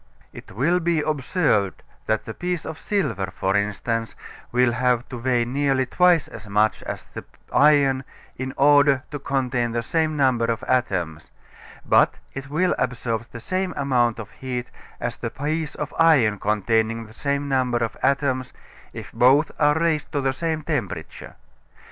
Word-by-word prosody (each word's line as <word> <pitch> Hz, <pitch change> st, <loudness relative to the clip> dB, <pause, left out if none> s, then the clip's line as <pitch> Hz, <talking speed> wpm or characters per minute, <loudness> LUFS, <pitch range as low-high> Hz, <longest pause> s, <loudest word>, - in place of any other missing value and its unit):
It -, -, -11 dB
will 155 Hz, -, +2 dB
be 170 Hz, -2 st, +1 dB
observed 145 Hz, -, 0 dB, 0.2 s
that 110 Hz, 0 st, 0 dB
the 110 Hz, -, -6 dB
piece 175 Hz, +2 st, -3 dB
of 160 Hz, -, -6 dB
silver, 130 Hz, -, -1 dB
for 95 Hz, +2 st, -1 dB
instance, 110 Hz, +3 st, -1 dB, 0.4 s
will 125 Hz, 0 st, +3 dB
have 125 Hz, 0 st, +1 dB
to 125 Hz, -, -6 dB
weigh 120 Hz, -1 st, +1 dB
nearly 135 Hz, +1 st, +1 dB
twice 175 Hz, +3 st, +3 dB
as 110 Hz, -1 st, -11 dB
much 105 Hz, +2 st, +2 dB
as -, -, -5 dB
the -, -, -9 dB, 0.3 s
iron 140 Hz, -3 st, +4 dB, 0.3 s
in 130 Hz, +1 st, -4 dB
order 140 Hz, -1 st, +5 dB
to 145 Hz, -, -4 dB
contain 125 Hz, -4 st, -1 dB
the 115 Hz, 0 st, -1 dB
same 155 Hz, +3 st, 0 dB
number 130 Hz, -4 st, +2 dB
of 115 Hz, -1 st, -2 dB
atoms, 90 Hz, -11 st, -1 dB, 0.6 s
but -, -, +4 dB, 0.2 s
it 135 Hz, 0 st, -7 dB
will 175 Hz, +5 st, +1 dB
absorb 120 Hz, -2 st, -2 dB
the 120 Hz, -, -8 dB
same 185 Hz, +8 st, -2 dB
amount 125 Hz, -4 st, +1 dB
of 110 Hz, -3 st, -8 dB
heat 125 Hz, -2 st, -5 dB, 0.3 s
as 120 Hz, -, -3 dB
the 115 Hz, -, -4 dB
piece 150 Hz, +5 st, -3 dB
of 150 Hz, -, -5 dB
iron 130 Hz, -11 st, +4 dB
containing 110 Hz, +2 st, 0 dB
the 110 Hz, -, -15 dB
same 140 Hz, +3 st, -2 dB
number 130 Hz, -3 st, +1 dB
of 115 Hz, -1 st, -2 dB
atoms, 130 Hz, -2 st, 0 dB, 0.4 s
if -, -, -8 dB
both 135 Hz, +5 st, +4 dB
are 150 Hz, 0 st, +4 dB
raised 160 Hz, -3 st, 0 dB
to 145 Hz, -, 0 dB
the 135 Hz, 0 st, 0 dB
same 160 Hz, +1 st, -2 dB
temperature. 115 Hz, -, -4 dB
130 Hz, 160 wpm, -23 LUFS, 115-145 Hz, 0.6 s, order